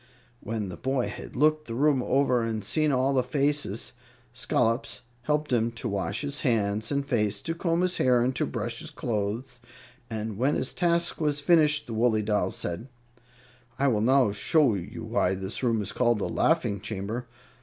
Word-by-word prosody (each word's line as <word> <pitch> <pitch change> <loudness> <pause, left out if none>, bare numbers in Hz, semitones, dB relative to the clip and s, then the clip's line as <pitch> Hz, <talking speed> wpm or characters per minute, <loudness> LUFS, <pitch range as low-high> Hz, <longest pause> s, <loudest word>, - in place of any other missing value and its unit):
When 110 -3 -4
the 85 - -7
boy 130 -2 -1
had - - -9
looked 155 +3 +2
the 115 - -4
room 140 0 +3
over 130 -2 +2
and 110 -2 -2
seen 155 -1 +2
all 135 +1 +2
the 130 - +3
faces, 140 -3 -1 0.4
Scollops 120 0 0 0.2
helped 150 +1 -1
him 115 -1 +2
to 115 +1 -4
wash 100 -5 -2
his 145 0 -2
hands 110 -3 0
and 140 -1 0
face, 105 -6 0
to 165 - -2
comb 165 0 0
his 185 0 +1
hair 125 -1 +4
and 130 +1 0
to - - 0
brush 115 0 -4
his - - -7
clothes, 115 +3 -3 0.5
and 110 -2 -4
when 135 +4 +2
this 130 - -2
task 170 -1 +1
was 150 -1 +1
finished, 150 -1 +4
the 115 - -6
woolly 110 -1 +2
doll 105 0 +1
said: 85 +8 -4 0.9
"I 140 0 +3
will 105 -4 +1
now 130 -1 +4
show 135 - +2
you 95 -4 -6
why 90 +1 +1
this 95 +2 -3
room 115 -4 +1
is - - -5
called 120 -2 +2
the 105 - -2
laughing 125 -11 +1
chamber. 110 +4 -4
125 Hz, 185 wpm, -27 LUFS, 110-145 Hz, 0.9 s, hair